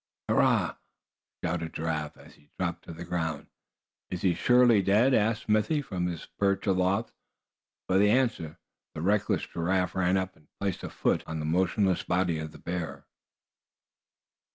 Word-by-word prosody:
"Hurrah!" - - +2 0.7
shouted 80 -1 -2
Giraffe, 80 -2 -3
as - - -16
he 75 0 -24
dropped 85 -2 -3
to - - -8
the 85 +1 -8
ground. 80 -4 -2 0.6
"Is 90 - -5
he 90 -3 +4
surely 120 +2 +5
dead?" 105 +8 +4
asked 110 -1 +2
Smithy, 110 +8 +2
from 90 -7 -2
his 85 -3 -5
perch 100 -1 +1
aloft. 95 +3 +1 0.8
For 95 +1 +3
answer 105 -8 +2 0.4
the 80 - -4
reckless 100 +3 +1
Giraffe 90 +1 -1
ran 95 0 +2
up, 95 0 -3
and 75 - -25
placed 100 -3 -2
a - - -5
foot - - 0
on 80 - -4
the 75 - -3
motionless 95 +3 +1
body 90 -3 0
of 80 0 -5
the - - -13
bear. 85 -1 -5
90 Hz, 155 wpm, -28 LUFS, 85-100 Hz, 0.8 s, surely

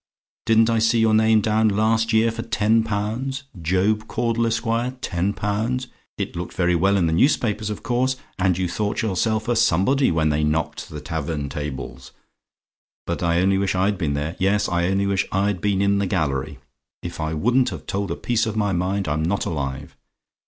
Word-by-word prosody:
Didn't 115 0 +5
I 115 - +2
see 115 +1 +3
your 110 -1 +3
name 110 0 +4
down 110 +1 +2
last 110 +2 +1
year 110 +1 +3
for 115 0 -5
ten 110 0 +2
pounds? 115 +6 -3 0.2
'Job 100 +6 +1
Caudle, 115 -1 0
Esq., 115 +2 -1 0.3
10 95 -4 -1
pounds.' 115 +6 -2 0.3
It - - -4
looked 85 +1 -5
very 90 0 +2
well 95 +4 +3
in 90 - +2
the 80 - +1
newspapers, 110 - +1
of 105 - -6
course: 130 +2 +1 0.2
and 90 -2 +2
you 95 -1 0
thought 105 +5 -2
yourself 110 +2 0
a 120 - +1
somebody, 120 +5 +3
when 80 -2 +1
they 75 0 +1
knocked 75 +1 -1
the - - -7
tavern 80 -3 -3
tables; 65 -3 -6 0.9
but 85 - -3
I 85 0 +2
only 95 +1 +2
wish 95 -1 0
I'd 95 +2 +1
been 75 -5 -1
there 75 +4 -3
yes, 100 +2 +2
I 85 0 0
only 95 +1 +1
wish 100 -1 0
I'd 100 -1 0
been 100 -1 +1
in 100 0 +2
the 100 - 0
gallery. 70 -6 -1 0.5
If - - -6
I 80 0 -2
wouldn't 125 +10 +2
have - - -8
told 100 0 -2
a - - -2
piece 115 -2 0
of 110 0 -3
my 100 -2 +1
mind, 95 +2 -1
I'm 75 +1 0
not 90 +5 0
alive. 70 -3 -4
100 Hz, 195 wpm, -22 LUFS, 85-110 Hz, 0.9 s, Didn't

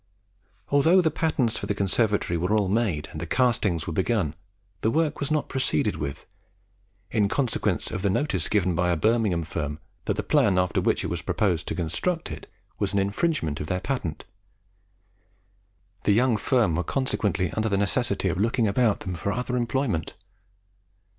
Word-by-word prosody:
Although 160 +6 +5
the 160 -3 +1
patterns 145 -8 0
for - - -5
the 100 - -1
conservatory 100 -2 +1
were 90 +5 +1
all 100 -2 +1
made, 95 -7 0
and 80 - -6
the 85 - -4
castings 110 -8 +1
were 85 - -4
begun, 95 -4 0 0.5
the 110 - +2
work 155 +3 0
was 140 - -2
not 155 -2 0
proceeded 130 -4 0
with, 70 -2 -5 0.9
in 105 -3 +2
consequence 130 0 0
of 95 - -3
the 100 - +1
notice 95 - 0
given 95 -4 +2
by 90 +1 +1
a 85 - +2
Birmingham 110 -4 +2
firm 75 -2 -4 0.3
that - - 0
the - - -2
plan 95 -3 +3
after 90 -2 +1
which - - +1
it - - -3
was 85 -1 -2
proposed 90 -2 0
to - - -2
construct 90 - -2
it - - -8 0.3
was - - 0
an 100 - +2
infringement 100 - 0
of 75 - -4
their 90 - -1
patent. 95 - -3 1.8
The 105 - +5
young 120 +2 +3
firm 110 - +2
were 90 - 0
consequently 105 - 0
under 110 +3 -1
the 100 - +1
necessity 100 0 +1
of 90 +1 -2
looking 115 +2 +2
about 110 +1 +2
them 95 - -4
for 95 +3 -2
other 125 +3 -2
employment. 120 - -1
105 Hz, 175 wpm, -25 LUFS, 90-125 Hz, 1.8 s, Although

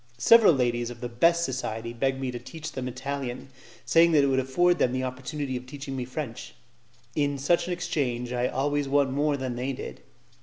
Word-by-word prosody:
Several 225 - +7
ladies 120 -4 0
of 120 -1 -9
the 120 - -4
best 170 +8 +3
society 115 -3 -4
begged 135 +2 0
me 130 -1 -2
to 120 - -6
teach 160 +6 -8
them 130 -1 -4
Italian, 130 0 -5 0.4
saying 165 0 +5
that 145 -2 +5
it - - +3
would 130 0 +2
afford 175 +7 +2
them 125 - +2
the 130 0 -1
opportunity 130 +2 -4
of 125 0 -6
teaching 140 0 -6
me 125 -2 -3
French; 130 -2 -6 0.6
in 145 -1 +1
such 155 +7 +1
an 180 - -1
exchange 125 -8 -2
I 125 0 +1
always 145 +2 -1
won 140 -1 +3
more 145 +1 +1
than 130 -2 -3
they 130 +3 -2
did. - - -8
130 Hz, 200 wpm, -27 LUFS, 125-145 Hz, 0.6 s, Several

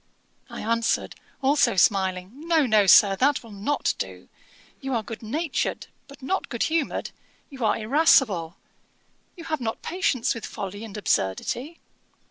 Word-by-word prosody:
I - - -7
answered, 230 +1 0 0.3
also 265 -4 +3
smiling, 185 0 +2
'No, 320 +2 +1
no, 215 -4 +3
Sir; 195 +3 +7
that 280 +3 +2
will 230 - -13
not 210 +9 -1
do. - - -6 0.5
You 270 -2 -3
are 225 - -1
good 220 +2 -8
natured, 290 +7 -2 0.2
but 280 -1 -15
not 380 +8 -2
good 235 - -1
humoured: 320 -3 -1 0.4
you 265 -3 -7
are 220 - +2
irascible. 220 - +3 0.8
You 335 - -9
have 310 -4 -3
not 225 -2 -4
patience 325 -9 0
with 230 - -8
folly 200 +2 -6
and 220 -2 -8
absurdity. 225 - -1
230 Hz, 145 wpm, -25 LUFS, 205-285 Hz, 0.8 s, Sir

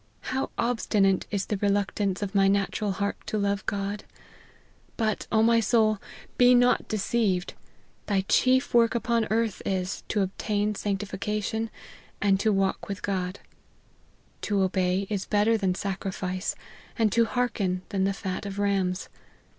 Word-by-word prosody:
How 265 - -1
obstinate 210 -5 +1
is 200 -2 -1
the 210 - -2
reluctance 200 0 0
of 195 - -3
the 195 -1 +4
natural 200 +1 0
heart 200 +1 -2
to 215 - -1
love 200 -1 0
God! 200 +1 -2 0.9
But, 215 -3 -1
O 220 0 +4
my 230 0 +5
soul, 215 -1 +3 0.4
be 245 0 +7
not 245 0 +3
deceived; 205 -3 0 0.5
thy 200 -2 +2
chief 255 +7 +2
work 235 0 +4
upon 235 -1 +1
earth 225 -2 0
is, 185 0 -2
to 205 - +1
obtain 205 +2 -1
sanctification, 210 +2 -2 0.5
and 195 -1 +3
to 215 +2 +2
walk 195 -1 0
with 195 -2 -5
God. 185 -1 -2 0.5
* - - -36
To 200 -2 +2
obey 185 0 +1
is 200 -2 -2
better 210 +2 +3
than 190 -4 0
sacrifice, 190 -1 -3 0.4
and 220 -3 +2
to 230 +3 +4
hearken 210 -7 -1
than 195 -3 0
the 195 +1 +1
fat 190 +1 -4
of 200 0 -6
rams.' 195 -2 0
200 Hz, 145 wpm, -27 LUFS, 195-220 Hz, 0.9 s, be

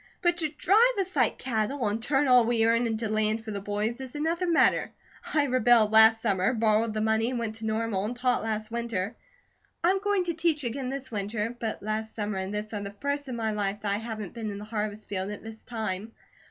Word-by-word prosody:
But 345 -1 +3
to 320 -3 +1
drive 425 +11 +3
us 375 -2 -2
like 250 -5 +2
cattle, 240 +1 -1
and 210 +2 -1
turn 270 +3 +2
all 250 -1 +7
we 225 -1 +2
earn 230 +1 +3
into 225 0 -2
land 215 +1 0
for 220 - -5
the 200 -1 -4
boys, 210 +5 -2
is 260 +1 -8
another 330 +4 -1
matter. 335 -2 +3 0.4
I 300 - +3
rebelled 240 -5 +4
last 220 0 +7
summer, 200 +2 +1
borrowed 220 0 +2
the 215 - 0
money 220 +1 +2
and 255 - -2
went 230 -2 -2
to 220 0 -5
Normal 220 -3 -1
and 235 +4 -3
taught 245 0 +1
last 215 0 -3
winter. 230 -3 -2 0.7
I'm 375 +3 +3
going 405 -1 +1
to 345 -1 -2
teach 320 -2 0
again 250 +2 -3
this 270 -1 -5
winter; 210 +2 -3
but 220 -3 -4
last 215 +1 -3
summer 210 -2 -2
and 190 +1 -4
this 210 +1 -4
are 205 - -3
the 200 0 -7
first 285 0 -2
of 255 - -4
my 225 -2 -1
life 205 -1 -2
that 200 -1 -1
I - - 0
haven't 220 -3 -6
been 225 -2 -4
in 200 - -5
the 205 - -8
harvest 215 -1 -3
fields, 190 0 -3
at 210 - -10
this 220 0 -10
time. 220 -2 -4
225 Hz, 230 wpm, -27 LUFS, 215-255 Hz, 0.7 s, all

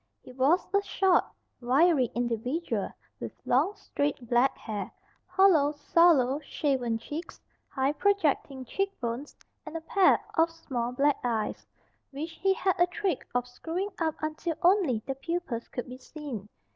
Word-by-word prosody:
He - - -12
was 270 +8 +2
a 400 - +4
short, 385 -2 +3 0.4
wiry 265 +1 +4
individual, 245 +7 -1 0.3
with - - -6
long, 310 +12 +2
straight 285 -4 -3
black 245 +3 +3
hair, 205 -4 -5 0.4
hollow, 365 -6 +4
sallow, 290 -3 +4
shaven 265 -6 -1
cheeks, 300 +8 -7 0.3
high 270 +2 0
projecting 295 -8 +1
cheek 390 +9 -2
bones, 240 +4 -4 0.3
and 315 +1 -6
a - - -7
pair 390 +2 +4
of 325 0 +3
small 250 -7 -4
black 280 +3 +2
eyes, 230 -3 -2 0.4
which 300 +4 -5
he 385 +4 +1
had 380 -1 +1
a 350 - +5
trick 360 -3 -2
of 245 0 +1
screwing 335 +10 -4
up 320 -2 0
until 310 +2 -2
only 345 - +3
the 270 - -2
pupils 270 -4 -4
could 245 - -5
be 250 +1 -9
seen. 260 -7 -7
290 Hz, 145 wpm, -28 LUFS, 250-345 Hz, 0.4 s, a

